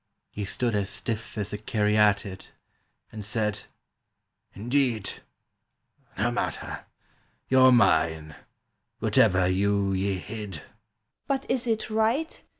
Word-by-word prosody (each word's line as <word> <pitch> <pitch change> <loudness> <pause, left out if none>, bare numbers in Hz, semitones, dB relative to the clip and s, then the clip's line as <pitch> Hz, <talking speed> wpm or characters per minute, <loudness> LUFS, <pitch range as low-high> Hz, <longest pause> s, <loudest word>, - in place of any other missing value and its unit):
— - - -54
He 105 - -4
stood 120 +3 +1
as 100 -1 0
stiff 110 +2 -4
as 105 0 -3
a 105 - -4
caryatid, 105 -2 +1 0.6
And 110 -1 -7
said, 105 -1 -2 0.9
"Indeed!... 120 -1 -1 1.0
No - - +1
matter. - - -4 0.6
You're 130 0 +6
mine, 80 -9 +3 0.6
whatever 90 0 +3
you 100 +1 +1
ye 95 0 0
hid!" 105 -5 -7 0.6
"But 270 -1 -1
is 255 -1 +1
it 220 -1 -1
right! 225 +9 0
105 Hz, 110 wpm, -26 LUFS, 95-120 Hz, 1.0 s, You're